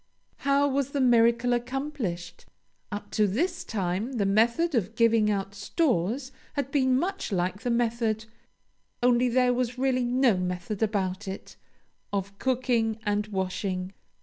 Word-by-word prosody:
How 280 +1 +2
was 280 0 -1
the 285 - 0
miracle 235 -1 +4
accomplished? 240 -8 -4 0.4
Up 205 0 -6
to 210 -1 +3
this 335 - -1
time, 200 +4 -2
the 215 -5 0
method 235 +12 +2
of 225 -3 0
giving 230 -2 +4
out 200 -1 -1
stores 245 - 0 0.2
had 280 -2 -2
been 260 -3 +3
much 380 - -2
like 185 +2 -1
the 245 - -2
method 230 -2 0 0.8
(only 245 0 +4
there 250 0 +3
was 250 0 -1
really 255 -1 +1
no 245 -3 +3
method 180 +3 -3
about 200 -2 -1
it!) 190 +1 -7 0.6
of 200 0 -3
cooking 240 -4 +1
and 205 0 0
washing. 190 -1 -3
230 Hz, 140 wpm, -27 LUFS, 200-255 Hz, 0.8 s, miracle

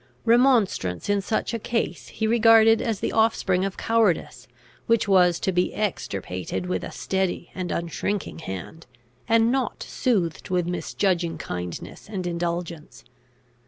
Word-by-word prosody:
Remonstrance 230 - +2
in 200 -1 +2
such 215 +4 -2
a 230 - -2
case 230 +1 -2
he 220 - -3
regarded 225 0 +6
as 225 -5 -2
the - - -1
offspring 220 -4 +2
of 195 -1 -3
cowardice, 205 - 0 0.4
which 230 -2 +2
was 180 -3 +4
to 190 - 0
be 180 0 0
extirpated 100 - -3
with 180 - -2
a - - -5
steady 190 -2 -2
and 185 -1 -4
unshrinking 170 +3 -3
hand, 155 - -7 0.4
and 230 +1 +4
not 260 -3 -1
soothed 185 -10 -1
with 180 -2 +1
misjudging 175 -1 -1
kindness 90 - -6
and 190 -4 -4
indulgence. 170 -2 -4
190 Hz, 135 wpm, -24 LUFS, 170-225 Hz, 0.4 s, regarded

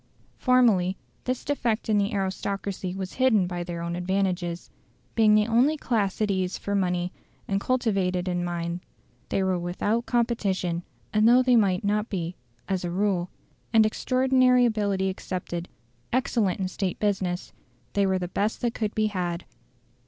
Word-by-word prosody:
Formerly 220 -8 +3 0.3
this 255 0 -2
defect 240 -6 -1
in 215 -2 +3
the 200 +2 0
aristocracy 195 -1 -3
was 190 -1 -5
hidden 220 -8 +4
by 175 -1 -3
their 170 -1 -5
own 170 0 -3
advantages. 180 -1 -1 0.4
Being 215 -2 +5
the 210 0 +4
only 245 +7 +3
class 215 -9 0
at 210 - +1
ease 185 -1 -1
for 200 - -4
money 180 -2 0 0.3
and 195 0 0
cultivated 195 -8 0
in 175 -1 0
mind 170 0 -3 0.5
they 195 - +1
were 185 -1 +1
without 205 +7 -1
competition; 200 -8 0 0.3
and 215 +1 +5
though 250 +2 +6
they 250 -1 +4
might 195 -4 +3
not 210 +2 0
be, 180 -3 -3 0.3
as 190 -1 -1
a 175 - -2
rule, 185 -1 0 0.4
and 220 -1 +6
extraordinary 255 +2 +3
ability 205 -4 +1
excepted, 180 -2 -4 0.4
excellent 230 -7 +1
in 190 - 0
State 185 -1 -3
business, 190 -4 -1 0.4
they 200 -1 +2
were 190 0 +2
the 180 -1 -3
best 205 +4 -1
that 240 -1 0
could 215 -2 -2
be 215 - +2
had. 180 -4 -2
195 Hz, 160 wpm, -26 LUFS, 180-220 Hz, 0.5 s, though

